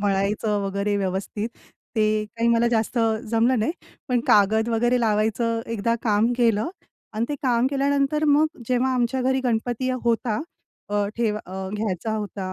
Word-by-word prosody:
मळायचं 205 +1 0
वगैरे 200 +1 -1
व्यवस्थित, 200 +3 -2 0.5
ते 215 0 +2
काही 230 +1 +1
मला 235 0 +3
जास्त 230 +1 0 0.3
जमलं 235 +2 +3
नाही. 220 +9 0 0.4
पण 245 -2 +2
कागद 220 +3 +4
वगैरे 240 +2 +2
लावायचं 225 +1 +1
एकदा 230 +2 0
काम 215 +1 +2
केलं 230 -1 +2 0.4
आणि 220 +2 -1
ते 295 - -1
काम 245 -1 +2
केल्यानंतर 280 +2 +1
मग 295 +2 +5 0.2
जेव्हा 255 +1 +2
आमच्या 250 +1 0
घरी 265 +1 +1
गणपती 245 +2 0
होता 230 -2 +1 0.5
अ, 205 -1 +1
ठेव 225 -3 0
अ, 190 -2 -6
घ्यायचा 215 0 -2
होता, 200 -3 -4
225 Hz, 150 wpm, -24 LUFS, 210-245 Hz, 0.5 s, मग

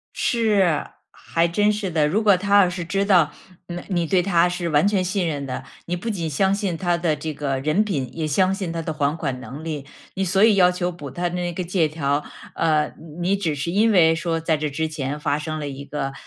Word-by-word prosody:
是， 205 -9 +2 0.3
还 165 +1 0
真 205 +5 +2
是 205 -2 -3
的。 155 -3 +2
如 215 +7 +1
果 200 -3 +5
他 200 +1 +4
要 180 - +3
是 175 -1 -5
知 195 +3 0
道， 180 -7 +4 0.4
呃， 175 0 -6
你 175 -3 0
对 180 +2 +2
他 175 -2 +3
是 175 -1 -3
完 155 +6 +3
全 200 -3 +1
信 185 -1 -1
任 145 -3 -3
的， 125 - -4 0.2
你 175 - -2
不 180 +6 -7
仅 170 -6 -2
相 190 +7 +2
信 200 -4 -1
他 175 0 +1
的 170 -3 0
这 155 +1 -5
个 135 -2 -2
人 155 +9 +2
品， 145 -11 -2
也 160 -1 -2
相 185 +6 +2
信 190 -4 -3
他 165 - -3
的 160 - -3
还 150 +1 0
款 135 -5 -3
能 140 +4 -8
力。 150 -4 -4 0.3
你 195 - -1
所 190 +3 +2
以 225 - +6
要 180 -2 +5
求 180 0 -2
补 150 -5 -8
他 175 +6 -2
那 175 0 -2
个 180 +2 -4
借 170 -2 +1
条， 145 -1 -1 0.3
呃， 155 -2 +1 0.3
你 180 +3 0
你 - - +2
只 165 -6 -1
是 150 +5 -3
因 220 +4 +3
为 165 -4 +5
说 165 0 -1
在 160 -1 +1
这 150 0 -2
之 160 +3 -2
前 150 -1 -4
发 150 -1 0
生 155 0 -4
了 145 - -4
一 140 0 -7
个， 140 -1 -4
170 Hz, 260 characters per minute, -22 LUFS, 150-185 Hz, 0.4 s, 以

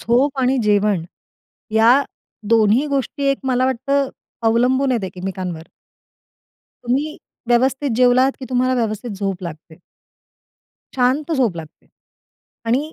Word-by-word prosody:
झोप 265 +4 +1
आणि 260 +1 +2
जेवण 205 -4 +2 0.7
या 225 +2 +6 0.6
दोन्ही 225 +5 +3
गोष्टी 280 0 -2
एक 275 - -1
मला 255 -1 +1
वाटतं 275 +2 0 0.4
अवलंबून 255 +4 +2
आहेत, 225 -5 -1
एकमेकांवर. 180 -3 -6 1.2
तुम्ही 275 +6 -1 0.3
व्यवस्थित 265 +3 +2
जेवलात 255 +2 +4
की - - -5
तुम्हाला 255 0 +1
व्यवस्थित 230 0 -2
झोप 195 -2 -4
लागते. 160 -1 -8 1.2
शांत 265 +6 +1
झोप 245 - +1
लागते 160 -2 -11 0.8
आणि 275 +8 0
245 Hz, 110 wpm, -19 LUFS, 205-265 Hz, 1.2 s, या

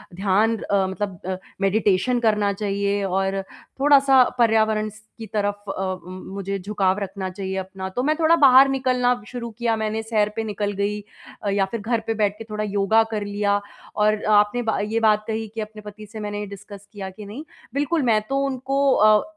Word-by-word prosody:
ध्यान 205 +4 +2
अ, 200 -2 0
मतलब 190 -1 -4
अ, 190 -1 -2 0.2
मेडिटेशन 205 +4 +2
करना 210 -3 +2
चाहिए 200 0 -1
और 195 +1 0 0.4
थोड़ा-सा 275 -2 +6 0.2
पर्यावरण 220 -2 +3
स 215 +1 -15 0.2
की 225 - -7
तरफ 205 -1 -1
अ, 190 - -3
उम, 185 -1 -4 0.2
मुझे 195 0 -3
झुकाव 195 0 0
रखना 190 -1 -4
चाहिए 190 0 -5
अपना 190 0 -5
तो 245 +7 -2
मैं 305 +3 +2
थोड़ा 325 +1 +5
बाहर 275 -3 +7
निकलना 250 -3 +1
शुरू 240 -2 -6
किया 235 -2 +1
मैंने, 220 0 -2
सैर 215 -2 +1
पे 225 - -2
निकल 205 -1 -2
गई 210 +1 -1 0.4
अ, 205 - 0
या 195 -1 +2
फिर 230 -3 -3
घर 230 +2 0
पे 225 - +1
बैठ 210 -2 0
के 225 - -7
थोड़ा 215 0 -3
योगा 205 +2 +3
कर 210 -2 -2
लिया 205 0 0 0.4
और 210 0 +2
आपने 210 +4 +3
बा 225 -2 -1
ये 215 +2 -1
बात 215 -1 +3
कही 220 0 -2
कि 225 - -2
अपने 215 0 -8
पति 210 +1 -10
से 215 +1 -9
मैंने 205 0 -4
डिस्कस 200 0 -11
किया 195 -2 -6
कि 205 +2 -11
नहीं। 220 +9 -8 0.3
बिल्कुल 295 +4 0
मैं 220 -3 +3
तो 275 - 0
उनको 270 +1 -1
अ, 215 0 +5
210 Hz, 195 wpm, -23 LUFS, 200-225 Hz, 0.4 s, बाहर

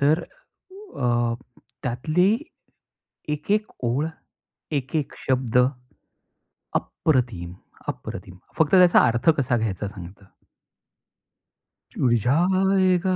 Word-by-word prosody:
तर 150 +4 +3
अ, 255 - -4 0.5
त्यातली 155 +10 +1 1.0
1-1 200 +9 0 0.2
ओळ, 135 +7 +1 0.7
1-1 140 +2 -3
शब्द, 130 -3 +1 1.2
अप्रतिम! 120 - -1 0.3
अप्रतिम! 90 - -6 0.2
फक्त 160 -2 +3
त्याचा 180 -1 +7
अर्थ 120 +7 0
कसा 130 -2 +1
घ्यायचा, 105 -3 -2
सांगतो. 95 0 -11 1.8
ऊड 120 -2 +4
जाएगा. 185 +4 +3
140 Hz, 80 wpm, -24 LUFS, 120-180 Hz, 1.8 s, त्याचा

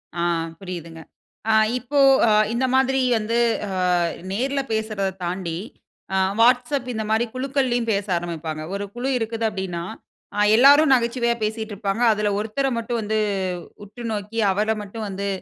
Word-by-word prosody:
அ. 170 - -2 0.4
புரியுதுங்க. 170 -3 -8 0.5
அ - - +4 0.3
இப்போ, 280 +4 -1 0.3
அ - - +4 0.2
இந்த 255 +2 +1
மாதிரி 265 0 +3 0.2
வந்து, 225 +2 -1 0.3
அ - - -5 0.6
நேர்ல 270 +6 0
பேசுறத 215 -3 -1
தாண்டி, 175 -2 -3 0.6
அ - - +2 0.2
Whatsapp 250 +2 +3
இந்த 220 0 -2
மாதிரி 225 +2 +2
குழுக்களிலும் 255 -3 0
பேச 200 0 -1
ஆரம்பிப்பாங்க. 160 -2 -5
ஒரு 200 0 -3
குழு 250 +3 -2
இருக்குது 225 0 -2
அப்படினா, 190 -4 -4 0.5
அ - - 0 0.2
எல்லோரும் 285 +4 +7
நகைச்சுவையா 235 -1 +1
பேசிட்டு 220 0 -3
இருப்பாங்க, 200 +2 -2
அதில 210 -1 0
ஒருத்தர 225 +6 -1
மட்டும் 230 0 -2
வந்து, 215 +1 -1 0.7
உற்று 235 +4 -10
நோக்கி 210 +2 -4
அவர 215 +3 0
மட்டும் 215 +2 -6
வந்து, 200 +1 -4
220 Hz, 145 wpm, -22 LUFS, 195-245 Hz, 0.7 s, எல்லோரும்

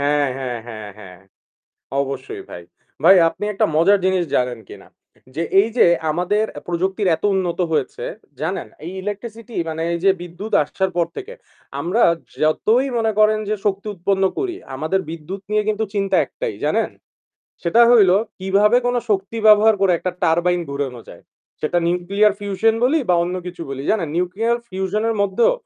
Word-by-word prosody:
হ্যাঁ, 145 0 +2
হ্যাঁ, 125 -3 -4
হ্যাঁ, 110 -3 -8
হ্যাঁ। 90 -4 -12 0.8
অবশ্যই 135 -1 -5
ভাই। 85 - -8 0.4
ভাই 190 +3 +8
আপনি 205 - -6
একটা 195 - +1
মজার 195 +5 +5
জিনিস 190 -2 +2
জানেন 125 -1 0
কিনা? - - -12 0.5
যে 165 - -2 0.2
এই 215 - +1
যে - - +6 0.2
আমাদের 180 +7 +1
অ্যা - - -9
প্রযুক্তির 190 +3 -1
এত 160 - -16
উন্নত 185 -2 -1
হয়েছে 150 -4 -2 0.4
জানেন? - - -2 0.2
এই 180 - -6
electricity 225 +3 -7
মানে 160 0 -3
এই 170 - -1
যে 195 - +6
বিদ্যুৎ 180 +5 -8
আসার 190 +6 -2
পর 170 -1 +2
থেকে 475 +5 -7 0.5
আমরা 200 +8 +1 0.4
যতই 220 - +2
মনে 225 -1 +1
করেন 215 0 +4
যে 215 - +1
শক্তি 200 0 -1
উৎপন্ন 195 +2 0
করি 370 -3 -2 0.2
আমাদের 160 +8 -1
বিদ্যুৎ 165 +4 -7
নিয়ে 215 0 +2
কিন্তু 215 +1 0
চিন্তা 195 -2 +1
একটাই - - -5
জানেন? - - +1 0.7
সেটা 175 +7 +3
হইল 210 -6 +6 0.3
কিভাবে 200 +4 +3
কোন 245 - +1 0.2
শক্তি 200 +2 -1
ব্যবহার 215 +1 +7
করে 195 -2 +4
একটা 185 - -3
turbine 175 +2 +2
ঘুরানো 140 -4 -4
যায়। - - -13 0.4
সেটা 155 +3 0
nuclear 190 +4 +2
fusion 205 +2 +1
বলি 305 +6 +3
বা 180 - +4
অন্য 180 +1 -3
কিছু 175 -1 -7
বলি 135 0 -5
জানেন 180 -8 0
nuclear 195 +7 0
fusion-এর 200 +4 -1
মধ্যেও 200 - +2
190 Hz, 165 wpm, -20 LUFS, 165-215 Hz, 0.8 s, ভাই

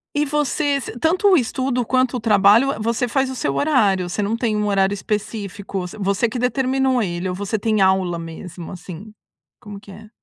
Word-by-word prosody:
e 295 +1 +2
você 290 0 0
ce 240 -2 -8
tanto 360 - +2
o 390 - +6
estudo, 255 -1 -1
quanto 255 +1 +1
o - - -4
trabalho, 215 +4 +4
hã, - - -6
você 230 +3 -1
faz 265 +2 0
o - - -6
seu 140 - -2
horário? 205 - +2
Você 180 - -2
não 205 +2 0
tem 230 -3 0
um 210 0 0
horário 195 -1 +2
específico? 205 -1 -4
Vo 205 +3 -7
você 200 +4 +1
que 250 - -5
determinou 260 0 +1
ele? 180 -2 -2
Ou 180 - -3
você 205 +3 -2
tem 215 0 0
aula 190 -2 +2
mesmo, 165 +1 -8
assim, 185 +3 -9 0.5
como 205 -1 -10
que 200 - -14
é? 215 +3 -12
215 Hz, 205 wpm, -20 LUFS, 195-255 Hz, 0.5 s, o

